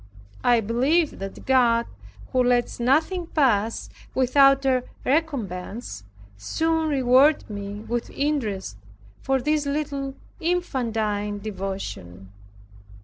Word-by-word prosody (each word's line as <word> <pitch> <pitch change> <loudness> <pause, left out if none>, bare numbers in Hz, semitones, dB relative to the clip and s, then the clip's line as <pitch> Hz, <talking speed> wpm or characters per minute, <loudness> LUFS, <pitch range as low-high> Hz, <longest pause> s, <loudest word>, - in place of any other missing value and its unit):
I 240 -2 +4
believe 270 +9 +1
that 195 0 -7
God, 235 -3 +3 0.5
who 255 -1 +3
lets 245 -1 +1
nothing 315 +8 +1
pass 230 -9 +1 0.3
without 275 +1 +4
a 255 -2 +2 0.2
recompense, 225 - -2 0.3
soon 320 - 0
rewarded 270 +2 +4
me 205 0 -6
with 235 +1 -3
interest 225 - -2 0.4
for 270 0 +1
this 300 +2 0
little 280 -2 -3 0.2
infantine 225 -12 -1
devotion. 190 - -6
250 Hz, 95 wpm, -24 LUFS, 210-285 Hz, 0.5 s, I